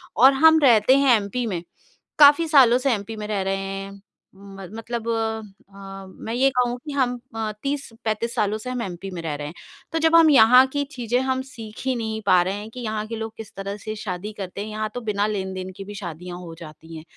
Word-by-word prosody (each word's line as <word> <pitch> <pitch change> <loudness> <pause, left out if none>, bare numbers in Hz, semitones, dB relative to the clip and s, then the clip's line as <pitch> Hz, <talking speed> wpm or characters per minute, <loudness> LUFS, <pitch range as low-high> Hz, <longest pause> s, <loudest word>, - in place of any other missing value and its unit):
और 265 +4 +7
हम 320 +3 +6
रहते 240 -1 +6
हैं 275 -3 +5
एमपी 210 +4 -3
में। 180 -5 -3 0.6
काफ़ी 295 +3 +7
सालों 265 -6 +6
से 260 +1 0
एमपी 220 +1 -5
में 210 -1 -6
रह 210 -2 -1
रहे 195 0 -1
हैं। 195 0 -5 0.4
म 195 -1 -11
मतलब 230 0 -5
अम, 200 -4 -5
मैं 225 - -3
ये 260 +3 +3
कहूँ 250 -2 0
कि 300 - -5
हम 250 -3 0 0.2
अ, 220 -1 -2
30-35 235 -5 -3
सालों 210 +1 0
से 220 +4 -7
हम 250 -1 -3
एमपी 185 -2 -6
में 175 -2 -6
रह 160 -2 -3
रहे 145 0 -6
हैं। 150 - -8 0.4
तो 325 - 0
जब 325 +1 +3
हम 330 -1 +7
यहाँ 250 -1 +7
की 285 0 0
चीज़े 245 -3 -1
हम 260 0 -1
सीख 220 -5 -10
ही 260 -1 +1
नहीं 220 -2 -3
पा 185 -2 +5
रहे 185 +2 -2
हैं 205 +2 -7
कि 250 - -10
यहाँ 215 -2 -3
के 230 - -5
लोग 225 0 -5
किस 220 -2 -10
तरह 195 +1 -5
से 215 +1 -6
शादी 205 0 -5
करते 195 0 -6
हैं, 210 - -5
यहाँ 215 0 -3
तो 245 - -4
बिना 210 -2 0
लेन-देन 190 -2 -4
की 195 - -6
भी 205 +1 -9
शादियाँ 175 -1 -7
हो 170 -2 -9
जाती 160 0 -11
हैं, 155 - -10
220 Hz, 225 wpm, -23 LUFS, 195-250 Hz, 0.6 s, और